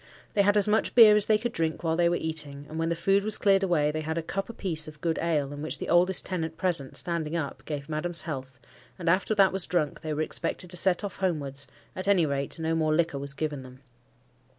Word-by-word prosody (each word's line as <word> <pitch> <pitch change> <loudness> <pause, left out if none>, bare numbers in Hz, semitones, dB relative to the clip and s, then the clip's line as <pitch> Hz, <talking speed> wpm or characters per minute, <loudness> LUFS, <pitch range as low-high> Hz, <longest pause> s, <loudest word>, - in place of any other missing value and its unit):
They 205 - +3
had 205 +1 +3
as 205 - +4
much 215 +1 +1
beer 220 -3 +9
as 210 -1 +3
they 215 - +4
could 240 +2 -3
drink 165 -4 -2
while 165 -1 0
they 170 0 +3
were 175 - +1
eating; 150 -4 -3
and 160 - -6
when 165 0 0
the 170 - 0
food 195 +4 +1
was 215 0 +4
cleared 195 -1 +3
away, 165 -6 +1
they 155 +1 -3
had 160 +1 -4
a 165 - -2
cup 195 +6 -4
a - - -7
piece 165 -8 -1
of 150 -1 -11
good 165 0 -1
ale, 150 -4 -1
in 145 - -8
which 155 - 0
the - - -6
oldest 180 +2 +4
tenant 165 -3 -4
present, 165 -8 +1
standing 170 -2 -2
up, 155 -5 -4
gave 145 -2 -5
Madam's 160 +2 -2
health; 130 -5 -7 0.4
and 175 - -7
after 190 +5 +2
that 195 -2 +4
was 190 -2 +1
drunk, 160 -4 -1
they 155 - -5
were 155 - 0
expected 175 +2 -4
to - - -1
set 185 +2 +3
off 200 - -5
homewards; 140 -7 -2 0.3
at 185 - -6
any 190 -5 +4
rate, 140 0 -2
no 160 0 -2
more 155 -1 +1
liquor 160 -4 0
was 140 0 -4
given 150 -2 -3
them. 130 0 -14
165 Hz, 250 wpm, -27 LUFS, 150-185 Hz, 0.4 s, beer